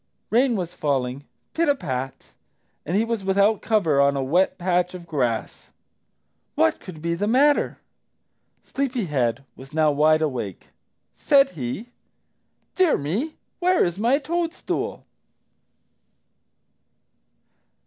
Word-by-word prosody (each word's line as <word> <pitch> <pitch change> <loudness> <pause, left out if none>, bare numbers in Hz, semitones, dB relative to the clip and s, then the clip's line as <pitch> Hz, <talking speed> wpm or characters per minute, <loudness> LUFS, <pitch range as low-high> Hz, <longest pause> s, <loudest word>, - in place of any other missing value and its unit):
Rain 245 +1 +3
was 180 -3 -3
falling, 140 -4 -2 0.3
pit 330 -2 +1
a 285 - +4
pat, 130 - -5 0.6
and 175 +5 +1
he 220 - +2
was 230 -3 -2
without 200 +2 +2
cover 165 -11 +2
on 140 0 +3
a 135 - -1
wet 175 +9 +2
patch 180 0 0
of 175 -1 -9
grass. 125 -9 -2 0.9
What 110 - +2
could 160 -4 -11
be 170 0 0
the 200 +5 -1
matter? 280 +6 +3 0.9
Sleepy 260 -5 -2
head 130 -6 -1
was 135 +2 -13
now 155 -1 +3
wide 155 +2 +3
awake. 120 - -4 0.5
Said 275 -1 +4
he, 160 - -5 0.8
"DEAR 370 -4 +3
ME, 205 - -3 0.2
WHERE 365 0 +3
IS 175 +2 -3
MY 240 +5 +3
TOADSTOOL?" 330 +3 -3
180 Hz, 120 wpm, -23 LUFS, -, 0.9 s, a